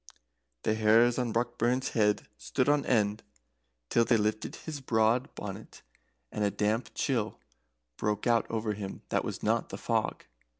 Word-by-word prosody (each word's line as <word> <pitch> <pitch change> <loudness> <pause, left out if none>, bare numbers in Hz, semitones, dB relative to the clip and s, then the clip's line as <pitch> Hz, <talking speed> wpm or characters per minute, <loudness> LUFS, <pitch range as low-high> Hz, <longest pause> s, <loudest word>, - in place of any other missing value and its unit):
The 110 - +2
hairs 110 +3 +4
on 120 -2 0
Brockburn's 120 +2 0
head 105 -2 +1
stood 70 - -1
on 145 -1 +2
end 105 -3 +2 0.7
till 115 - +4
they 115 0 +3
lifted 110 0 -1
his 150 -3 -7
broad 120 +2 +1
bonnet, 105 +1 -8 0.5
and 105 - -2
a 100 - +3
damp 105 +4 0
chill 115 -6 -1 0.6
broke 105 -1 -1
out 120 -2 +2
over 110 -1 -1
him 100 -2 -7
that - - +1
was - - -5
not - - +1
the - - -6
fog. - - -1
110 Hz, 155 wpm, -30 LUFS, 105-120 Hz, 0.7 s, hairs